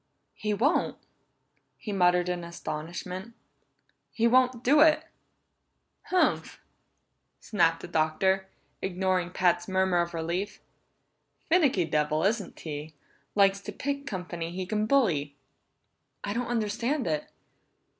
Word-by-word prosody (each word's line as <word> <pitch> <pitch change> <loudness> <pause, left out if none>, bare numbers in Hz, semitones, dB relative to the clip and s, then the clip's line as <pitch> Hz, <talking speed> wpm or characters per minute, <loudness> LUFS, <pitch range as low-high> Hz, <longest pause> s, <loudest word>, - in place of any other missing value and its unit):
"He 210 - -3
won't!" 275 - +1 0.8
he 215 - -6
muttered 180 -2 +3
in 180 -1 -2
astonishment. 175 +5 -6 0.8
"He 230 - 0
won't 250 0 +3
do 290 +4 +5
it!" 310 0 +6 1.0
"Humph!" 370 - +1 0.8
snapped 165 -6 +1
Horker, 190 +5 +1 0.4
ignoring 185 -1 0
Pat's 175 -1 +1
murmur 190 -2 +2
of 170 0 -3
relief. 170 +5 -3 0.9
"Finicky 290 - +4
devil, 155 0 0
isn't 205 -1 -1
he? 150 0 -6 0.4
Likes 200 -1 +4
to 210 - -6
pick 280 +5 -4
company 175 -4 -4
he 185 +2 -4
can 215 +2 -1
bully!" 165 - +2 0.9
"I 200 - -2
don't 240 +2 -2
understand 235 +4 -1
it!" 155 -2 -2
190 Hz, 110 wpm, -28 LUFS, 170-230 Hz, 1.0 s, it